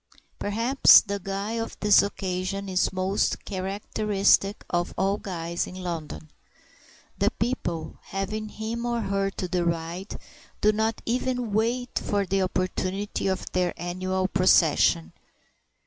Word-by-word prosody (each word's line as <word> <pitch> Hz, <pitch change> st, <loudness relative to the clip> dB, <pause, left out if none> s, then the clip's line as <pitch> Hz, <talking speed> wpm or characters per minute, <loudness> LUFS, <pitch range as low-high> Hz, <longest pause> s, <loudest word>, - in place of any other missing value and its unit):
Perhaps 230 Hz, +6 st, +6 dB
the 200 Hz, -1 st, -4 dB
guy 195 Hz, +2 st, -4 dB
of 225 Hz, -, -5 dB
this 210 Hz, -1 st, +6 dB
occasion 195 Hz, 0 st, -3 dB
is 185 Hz, -1 st, +1 dB
most 190 Hz, +1 st, 0 dB
characteristic 200 Hz, +1 st, +1 dB
of 175 Hz, 0 st, -1 dB
all 195 Hz, +2 st, +1 dB
guys 170 Hz, -2 st, -3 dB
in 180 Hz, -, -9 dB
London. 165 Hz, -4 st, -6 dB, 0.9 s
The -, -, +3 dB
people, 175 Hz, -9 st, -3 dB
having 215 Hz, +3 st, -4 dB
him 225 Hz, +2 st, -4 dB
or 235 Hz, -1 st, 0 dB
her 195 Hz, -1 st, 0 dB
to 190 Hz, -1 st, -5 dB
deride, 170 Hz, +1 st, -2 dB, 0.4 s
do 210 Hz, -, +4 dB
not 220 Hz, +1 st, -1 dB
even 245 Hz, -2 st, -1 dB
wait 235 Hz, +3 st, 0 dB
for 200 Hz, -1 st, -1 dB
the 195 Hz, +1 st, 0 dB
opportunity 185 Hz, +2 st, -2 dB
of 190 Hz, -1 st, -1 dB
their 180 Hz, -1 st, 0 dB
annual 185 Hz, +2 st, -2 dB
procession. 80 Hz, -, +3 dB
195 Hz, 125 wpm, -26 LUFS, 185-210 Hz, 0.9 s, Perhaps